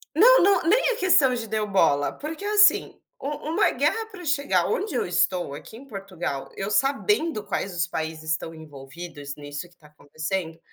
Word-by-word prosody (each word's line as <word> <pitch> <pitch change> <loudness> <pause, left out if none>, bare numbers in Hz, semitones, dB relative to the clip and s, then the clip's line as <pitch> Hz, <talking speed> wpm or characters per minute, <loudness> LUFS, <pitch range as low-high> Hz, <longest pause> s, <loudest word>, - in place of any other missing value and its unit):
Não - - +7
não, 400 +1 +4
nem 435 +9 +3
é 480 - +1
questão 340 - +4
de 230 -2 -5
deu 215 0 -2
bola, 160 -7 +2
porque, 315 +6 -7
assim, 420 0 +4 0.2
um 280 - -3 0.2
uma 410 - +3
guerra 450 0 0
para 395 -5 -11
chegar 285 -1 +1
onde 400 -9 -2
eu - - 0
estou 175 -2 0
aqui 185 +9 -10
em 270 - -13
Portugal, 180 - -5
eu 195 +2 -3
sabendo 280 - +1
quais 190 -2 -3
os 170 -1 +1
países 160 -1 -4
estão 165 +1 -2
envolvidos 145 0 -9
nisso 145 +3 -7
que 175 - -26
está 155 -3 -20
acontecendo, 160 +3 -5
195 Hz, 180 wpm, -24 LUFS, -, 0.2 s, Não